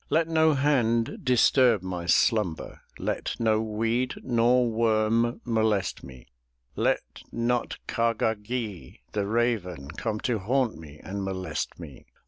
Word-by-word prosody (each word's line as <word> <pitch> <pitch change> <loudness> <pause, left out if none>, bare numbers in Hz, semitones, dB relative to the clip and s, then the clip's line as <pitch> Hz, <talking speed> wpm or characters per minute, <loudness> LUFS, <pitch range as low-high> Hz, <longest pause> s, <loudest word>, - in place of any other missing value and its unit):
Let 160 +2 +2
no 160 -2 +3
hand 120 -5 +1
disturb 125 -4 +4
my 90 -2 -5
slumber, 100 - +1 0.2
Let - - -3
no 110 -2 +2
weed 115 +3 -1
nor 120 0 +3
worm 115 +1 +1
molest 110 -4 0
me, 65 -2 -12 0.5
Let - - -1
not 120 +1 -1
Kah 115 0 +1
gah 110 0 +1
gee', 105 - -6
the 100 -2 -1
raven, 105 - -1
Come 105 +5 -3
to 120 -4 0
haunt 120 +4 0
me 75 -2 -12
and 100 +1 -4
molest 95 -5 -4
me. 75 -6 -11
110 Hz, 130 wpm, -26 LUFS, 95-120 Hz, 0.5 s, disturb